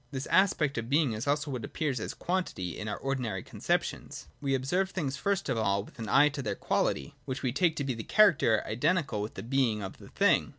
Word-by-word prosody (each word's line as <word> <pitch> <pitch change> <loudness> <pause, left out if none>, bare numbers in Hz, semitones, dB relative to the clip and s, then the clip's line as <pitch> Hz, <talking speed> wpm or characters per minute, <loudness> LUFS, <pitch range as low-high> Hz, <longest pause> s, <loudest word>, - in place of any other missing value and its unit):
This 135 0 -4
aspect 160 -9 +3
of 115 +1 -6
being 145 -4 +3
is 110 +5 -4
also 145 0 0
what 125 -4 -4
appears 140 -2 -2
as - - -5
quantity 175 - -2
in 110 - -5
our 105 - -3
ordinary 125 -8 -2
conceptions. - - -2 0.2
We 135 -1 +1
observe 180 +9 0
things, 145 -8 -2
first 200 +7 -1
of 115 - 0
all, 100 -2 +1
with - - -16
an 110 - -4
eye 145 +2 +6
to 140 -1 -5
their 105 -5 -2
quality - - -1
— - - -35
which 130 +2 -4
we 130 - +1
take 160 +5 +2
to 145 - -2
be 135 -2 -1
the 115 - -5
character 155 - +4
identical 145 - 0
with 105 - -5
the 95 - -6
being 120 -4 +1
of 95 - -7
the - - -13
thing. - - +3
135 Hz, 230 wpm, -30 LUFS, 110-150 Hz, 0.2 s, eye